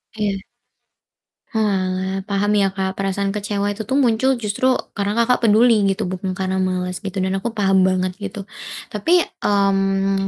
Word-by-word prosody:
Iya. 205 -2 -1 1.2
Oalah, 190 -3 0
paham 205 +1 +1
ya, 195 - +3
Kak, 190 0 -2
perasaan 195 0 -1
kecewa 205 0 -2
itu 205 0 -6
tuh 265 - 0
muncul 260 0 +3
justru 220 +1 -1 0.2
karena 205 0 -2
Kakak 235 0 +2
peduli, 225 +1 +5
gitu, 195 -1 0
bukan 185 +1 -3
karena 190 0 -1
malas, 185 -1 -1
gitu, 190 -2 -3
dan 190 +1 0
aku 230 +4 -4
paham 195 -3 +3
banget, 185 0 0
gitu. 200 -1 -6 0.5
Tapi, 335 - +3 0.2
mmm, 195 -1 +1
200 Hz, 150 wpm, -20 LUFS, 190-210 Hz, 1.2 s, peduli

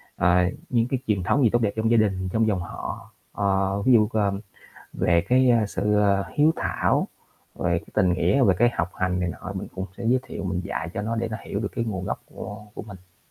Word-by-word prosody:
à, 90 +1 +3 0.2
những 120 -2 +2
cái 130 0 -1
truyền 100 -4 +1
thống 140 +9 +2
gì 115 - +5
tốt 120 +3 +1
đẹp 105 -3 +1
trong 110 +1 0
gia 115 - +5
đình, 95 -4 +1
trong 110 0 +2
dòng 100 -4 +1
họ. 85 - -7 0.2
Ờ, 95 0 0
ví 130 +5 +4
dụ, 110 -3 +5
ờ, 105 -2 +2 0.6
về 85 -1 +2
cái, 130 0 +5
a, 115 -3 +3
sự, 105 +1 0
à, 100 -1 +2
hiếu 150 +2 +4
thảo - - 0 0.5
về - - 0
cái - - -14
tình 90 -1 +3
nghĩa, 90 +9 +2
về 95 -4 +4
cái 120 - +5
học 90 -4 -2
hành 90 0 -1
này 90 - 0
nọ 95 +2 -6
mình 95 - -5
cũng 95 0 -4
sẽ 120 - -7
giới 125 +2 +4
thiệu 125 -6 -7
mình 95 -1 -1
dạy 80 - -3
cho 100 - -2
nó 115 +2 -2
để 115 0 -1
nó 110 - -4
hiểu 100 - -3
được 105 - -2
cái 115 - 0
nguồn 95 -5 -3
gốc - - -4
của 105 0 -9
của - - -6
mình. 95 -4 -14
100 Hz, 245 wpm, -24 LUFS, 95-115 Hz, 0.6 s, gì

